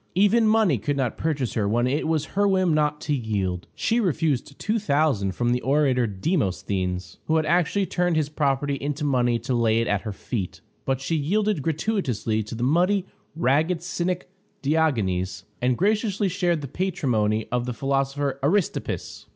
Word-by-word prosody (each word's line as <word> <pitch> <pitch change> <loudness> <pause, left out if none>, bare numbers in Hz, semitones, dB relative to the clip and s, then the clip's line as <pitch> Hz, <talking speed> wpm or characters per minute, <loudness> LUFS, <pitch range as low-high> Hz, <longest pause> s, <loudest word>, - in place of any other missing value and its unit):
Even 210 +4 +4
money 215 - +3
could 145 +7 -1
not 130 -4 0
purchase 145 -6 -1
her 100 -3 0
when 120 +3 +2
it 140 +5 0
was 155 -2 +1
her 205 +1 +3
whim 185 -4 +2
not 150 -1 +1
to 150 - -1
yield. 100 -8 -2
She 230 +1 +1
refused 155 - 0
$2000 150 - +1
from 120 +6 0
the 125 0 +1
orator 135 -3 +2
Demosthenes, 95 - -2
who 160 - +2
had 160 -1 +2
actually 180 +4 +2
turned 175 -1 0
his 155 -2 +1
property 145 -1 0
into 145 +1 -3
money 125 -4 +2
to 115 +3 -3
lay 115 -2 +2
it 115 - +1
at 100 -1 +1
her 110 - -5
feet; 100 -1 -4 0.3
but 135 -1 0
she 165 +5 -1
yielded 200 +4 +1
gratuitously 150 - -1
to 110 +2 -6
the 120 - -3
muddy, 180 +8 +2 0.3
ragged 160 +4 +1
cynic 175 0 -2 0.4
Diogenes, 110 - 0 0.2
and 125 0 +2
graciously 210 0 +1
shared 175 -3 0
the 140 - -5
patrimony 125 - 0
of 125 0 -1
the - - -1
philosopher 135 +1 -1
Aristippus. 170 +7 -1
145 Hz, 165 wpm, -24 LUFS, 120-175 Hz, 0.4 s, Even